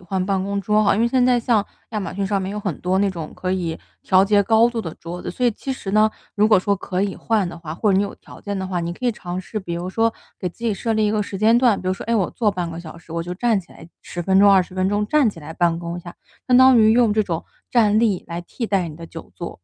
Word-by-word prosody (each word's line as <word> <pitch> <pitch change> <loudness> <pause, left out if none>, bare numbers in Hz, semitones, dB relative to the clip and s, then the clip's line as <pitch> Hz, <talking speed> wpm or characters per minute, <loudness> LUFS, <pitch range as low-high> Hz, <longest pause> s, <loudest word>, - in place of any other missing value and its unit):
换 185 +1 -2
办 195 -1 0
公 200 0 -2
桌 210 +2 +2
啊？ 200 - +4
因 210 - 0
为 235 - +3
现 250 +1 +2
在 250 -1 +4
像 230 -3 +1 0.3
亚 215 - -2
马 195 - -5
逊 195 0 -2
上 200 -1 0
面 190 - -4
有 210 - -4
很 195 -7 -3
多 185 +1 +1
那 200 0 +2
种 165 -4 -7
可 185 0 -3
以 170 -4 -2 0.2
调 190 +1 +4
节 205 0 +3
高 225 +3 +4
度 235 -1 -3
的 165 -6 -6
桌 175 +2 -8
子， - - -4
所 250 +7 0
以 - - +4
其 265 +5 -5
实 200 -6 -6
呢， 215 0 +4 0.2
如 210 +1 +3
果 215 -3 +6
说 200 +2 +1
可 185 0 -3
以 200 -1 -1
换 215 -5 0
的 170 - -8
话， 165 -2 -7
或 205 +2 +1
者 - - +3
你 195 - +3
有 205 - -4
条 - - -15
件 200 -1 -4
的 190 - -3
话。 180 -2 -2
你 170 0 -3
可 250 - -9
以 245 - +2
尝 180 -4 -6
试 205 +3 -5
比 170 -2 -5
如 175 +2 -4
说 225 +3 +1 0.3
给 180 - -2
自 230 +7 -11
己 225 - +2
设 225 +3 -2
立 215 0 +2
一 - - +1
个 215 -1 +1
时 200 - -6
间 220 +4 +4
段， 240 -5 +3
比 185 - -8
如 185 - +2
说， - - -6
诶， 235 - +1
我 195 -6 +1
坐 220 -3 +1
半 180 -4 -3
个 165 - -7
小 165 -1 -10
时 165 -1 -13
我 165 0 -2
就 180 +1 -5
站 220 0 +1
起 170 - -21
来 165 - -13
10 175 - -6
分 190 +2 +3
钟、 200 0 +7
20 185 -1 +3
分 185 0 +1
钟， 205 +1 0
站 295 -1 +3
起 200 - -6
来 155 +1 -8
办 170 0 +1
公 170 0 -5
一 - - -8
下， 175 0 -11 0.3
相 250 - +5
当 260 -1 +7
于 220 0 +6
用 235 -2 +4
这 215 +1 +2
种 170 -5 -4 0.3
站 215 -3 +4
立 215 -5 +1
来 170 0 -5
替 225 +6 -5
代 190 -5 0
你 150 - -10
的 165 0 -9
久 165 - -11
坐。 170 - -7
195 Hz, 335 characters per minute, -21 LUFS, 175-220 Hz, 0.3 s, 钟